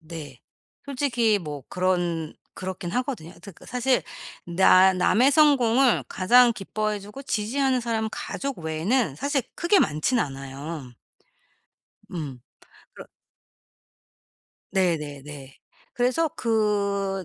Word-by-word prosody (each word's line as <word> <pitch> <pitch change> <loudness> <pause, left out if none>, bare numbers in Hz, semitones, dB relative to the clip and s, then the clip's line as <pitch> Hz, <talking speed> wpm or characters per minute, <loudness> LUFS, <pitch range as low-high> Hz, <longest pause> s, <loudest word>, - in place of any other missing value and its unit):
네. 155 -6 -10 0.4
솔직히 245 -6 +1
뭐 150 -6 -7
그런 175 -3 -1 0.2
그렇긴 185 -2 -5
하거든요. 250 - -3
하여튼 200 +2 -13
그 - - -17
사실 250 +1 +1 0.4
나 185 +2 +5
남의 215 +8 +3
성공을 270 -4 +4
가장 240 +6 +5
기뻐해 215 0 -3
주고 210 +7 -10
지지하는 260 +2 0
사람은 225 -2 -1
가족 275 -1 -5
외에는 160 - 0
사실 280 - -1
크게 350 +4 +3
많지는 155 - +1
않아요. 135 0 -7 1.2
음. 145 -7 -6 0.5
그러 - - -11 1.7
네네네. 150 -7 -2 0.4
그래서 255 +7 +1
그 200 -4 0
200 Hz, 225 characters per minute, -25 LUFS, 160-250 Hz, 1.7 s, 나